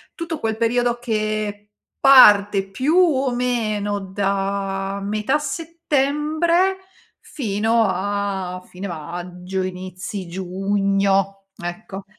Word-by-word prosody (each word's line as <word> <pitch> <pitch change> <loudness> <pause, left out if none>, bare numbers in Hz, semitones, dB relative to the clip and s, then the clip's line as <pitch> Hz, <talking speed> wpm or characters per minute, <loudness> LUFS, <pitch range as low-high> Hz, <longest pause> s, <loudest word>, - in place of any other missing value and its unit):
tutto 335 -2 -4
quel 220 -1 -2
periodo 240 +1 +1
che 215 -2 -2 0.3
parte, 205 -7 +7
più 265 - 0
o 275 -8 +3
meno, 215 -5 -1
da 195 0 -2
metà 215 +8 0
settembre 325 +3 0 0.4
fino 225 -3 0
a 190 -1 -2
fine 190 +2 -7
maggio, 180 +3 -5
inizi 185 +1 -6
giugno, 195 +1 0
ecco. 190 +2 -7
205 Hz, 90 wpm, -21 LUFS, 195-245 Hz, 0.4 s, parte